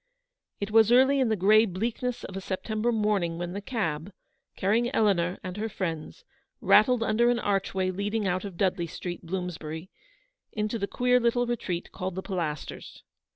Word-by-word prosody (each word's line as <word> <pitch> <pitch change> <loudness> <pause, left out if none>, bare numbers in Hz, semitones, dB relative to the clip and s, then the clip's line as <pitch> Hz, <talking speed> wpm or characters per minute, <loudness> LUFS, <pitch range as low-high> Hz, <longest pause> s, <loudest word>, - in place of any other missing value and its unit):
It 200 +1 -3
was 220 0 +5
early 265 +3 +5
in 255 -3 +2
the 220 - +2
grey 210 +3 +5
bleakness 230 +6 -3
of 190 - -7
a 195 - -4
Sep 190 0 -4
tember 220 +2 0
morning 210 -7 0
when 175 +1 -4
the 200 - -4
cab, 195 - -3 0.4
carrying 225 +5 +1
Eleanor 180 -4 +2
and 185 +1 -6
her 220 +2 -2
friends, 185 - -5 0.3
rattled 230 +2 +5
under 230 +2 +3
an 245 - +2
archway 195 -3 0
leading 205 +2 -1
out 185 0 0
of 195 -4 -7
Dudley 180 -3 0
Street, 175 +3 -6
Bloomsbury, 170 -1 -5 0.6
into 215 +1 -2
the 200 - -1
queer 250 +2 +2
little 245 +1 +2
retreat 200 -7 -3
called 185 -1 -4
the 190 - -4
Pilasters. 165 -6 -5
200 Hz, 170 wpm, -27 LUFS, 180-225 Hz, 0.6 s, was